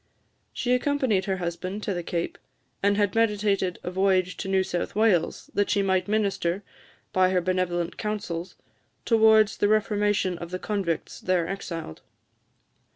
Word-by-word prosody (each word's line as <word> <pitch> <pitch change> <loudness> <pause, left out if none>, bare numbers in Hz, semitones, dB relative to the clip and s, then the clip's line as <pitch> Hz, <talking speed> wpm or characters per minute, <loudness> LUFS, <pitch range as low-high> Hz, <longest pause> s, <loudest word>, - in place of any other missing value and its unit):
She 250 0 0
accompanied 250 -7 +1
her 190 -2 -1
husband 180 +3 -4
to 200 - -1
the 175 - -3
Cape, 170 0 -3 0.4
and 200 0 +2
had 205 -2 +2
meditated 205 -5 +1
a 180 - -4
voyage 185 -1 +2
to 195 - -5
New 190 0 +2
South 175 0 -3
Wales, 210 -6 +1
that 205 - +1
she 200 - +2
might 190 0 +1
minister, 200 -3 0 0.5
by 185 0 +4
her 185 -1 +2
benevolent 175 -1 -1
counsels, 200 -5 -4 0.5
towards 220 -2 +5
the 205 - +2
reformation 205 -4 +1
of 170 - -7
the 185 - -3
convicts 185 -5 -3
there 180 -3 0
exiled. 165 - -6
190 Hz, 150 wpm, -26 LUFS, 180-210 Hz, 0.5 s, towards